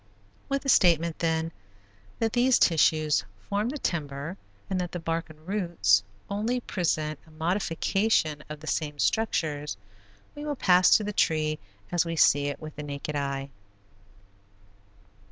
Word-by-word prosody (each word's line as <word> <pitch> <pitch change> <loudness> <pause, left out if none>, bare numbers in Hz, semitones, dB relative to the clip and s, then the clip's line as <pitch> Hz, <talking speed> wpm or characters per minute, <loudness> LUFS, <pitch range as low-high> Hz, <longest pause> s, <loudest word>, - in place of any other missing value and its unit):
With 275 -1 -1
the - - -6
statement, 170 - +4
then, 160 0 0 0.7
that 225 -1 0
these 250 +1 +4
tissues 155 -2 +3 0.2
form 205 +3 0
the 295 - -4
timber, 150 - -3 0.3
and 185 -1 -1
that 175 - -4
the 175 - -3
bark 165 0 -2
and 155 +1 -16
roots 170 - +2 0.3
only 220 +5 -1
present 155 - -1
a - - -17
modification 165 0 0
of 150 0 -7
the - - -9
same 150 -2 -2
structures, 150 - 0 0.6
we 295 - -8
will 295 -1 -2
pass 180 -6 +5
to 215 - -4
the 210 0 -3
tree 155 -4 +1 0.3
as 175 -1 +3
we 165 -1 -3
see 145 -2 +4
it 145 - -4
with 155 -1 -9
the - - -4
naked 145 +1 -5
eye. 140 -1 -3
165 Hz, 150 wpm, -27 LUFS, 150-195 Hz, 0.7 s, pass